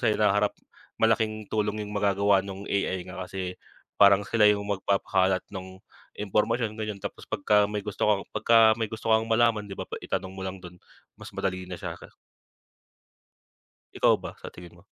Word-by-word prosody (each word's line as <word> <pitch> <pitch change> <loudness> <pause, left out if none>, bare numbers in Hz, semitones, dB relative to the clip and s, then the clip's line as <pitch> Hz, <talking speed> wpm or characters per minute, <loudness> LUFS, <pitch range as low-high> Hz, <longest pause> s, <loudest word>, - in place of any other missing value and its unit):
sa 110 -3 +2
hinaharap, 105 -1 +2 0.5
malaking 110 -1 +1
tulong 105 0 -1
yung 105 0 -5
magagawa 100 -1 +2
nung 100 0 -8
AI 95 -2 -1
nga 95 0 -6
kasi 90 -1 -5 0.4
parang 100 0 +6
sila 115 -2 +1
yung 100 0 -1
magpapakalat 95 -1 +1
nung 95 0 -8 0.4
impormasyon 105 +2 0
ganyan, 105 -2 -4
tapos - - -7
'pagka 105 -1 +2
may 105 -1 -3
gusto 105 0 -2
kang 105 -2 +2
'pagka 115 - +2 0.2
may 110 - 0
gusto 110 0 -4
kang 110 0 +3
malaman 115 -2 +2
'di 100 - -7
ba, - - -5 0.2
itanong 95 - -3
mo - - -5
lang 95 0 -7
dun 90 0 -11 0.4
mas - - -10
madali 95 -1 -3
na 90 - -6
siya - - -6
ka - - -14 1.8
Ikaw - - +4
ba - - -8
sa - - -7
tingin 85 -1 -13
mo? - - -20
100 Hz, 170 wpm, -27 LUFS, 95-110 Hz, 1.8 s, parang